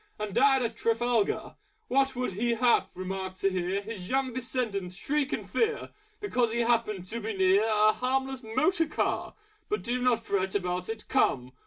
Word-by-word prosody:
And 210 -2 -4
died 270 +1 +4
at 230 -1 -2
Trafalgar! 230 -1 0 0.3
What 270 0 +2
would 250 -5 -2
he 235 +4 0
have 240 +1 +3
remarked 185 0 -5
to 195 - +2
hear 185 +2 -1
His 200 -4 -7
Young 265 -1 0
Descendant 230 -7 -2
shriek 280 +8 -1
with - - -3
fear, 450 0 0 0.3
Because 250 - 0
he 235 +1 0
happened 220 -5 +1
to 235 - -3
be 220 -2 -4
near 190 +2 +4
A 215 -1 +4
Harmless 265 +2 -1
Motor 305 - +1
Car! - - -2 0.3
But 420 - -1
do 245 +1 -1
not 240 -2 +2
fret 190 -1 -1
about 180 -1 -2
it! 225 -1 -6
Come! 125 0 +1
230 Hz, 175 wpm, -28 LUFS, 195-255 Hz, 0.3 s, died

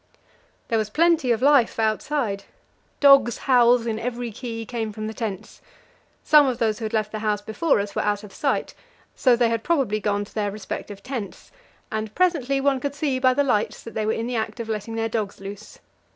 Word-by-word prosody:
There 225 - +2
was 215 -1 -2
plenty 325 0 +3
of 230 +1 0
life 280 -4 +4
outside; 220 -1 -1 0.5
dogs' 275 -5 +6
howls 245 -2 +4
in 220 -2 -2
every 240 0 -4
key 230 0 -6
came 225 -2 -3
from 215 +1 -6
the 220 - -4
tents. 210 -4 -6 0.6
Some 300 -2 +6
of 250 -2 -1
those 220 -2 0
who 225 - -4
had 215 - -3
left 215 -1 0
the 215 - -4
house 210 -1 0
before 220 +6 +1
us 200 0 -3
were - - -1
out 205 0 -1
of 200 -2 -12
sight, 275 +5 -1 0.4
so 255 -3 +4
they 235 -1 +2
had 230 -1 -1
probably 270 -11 +1
gone 205 0 -1
to - - -19
their 210 -2 -1
respective 200 0 -7
tents, 245 -8 -6 0.4
and 220 -1 -4
presently 295 -7 +1
one 270 -1 +2
could 285 +2 -4
see 280 -3 -1
by 255 -1 +3
the 285 - +3
lights 215 -6 0
that 230 - -9
they 215 -1 -2
were - - +2
in 225 - -3
the 245 +1 -3
act 220 0 -3
of 230 -1 -5
letting 220 +1 -4
their 225 0 0
dogs 215 -3 -3
loose. 200 +2 -9
225 Hz, 210 wpm, -23 LUFS, 215-260 Hz, 0.6 s, dogs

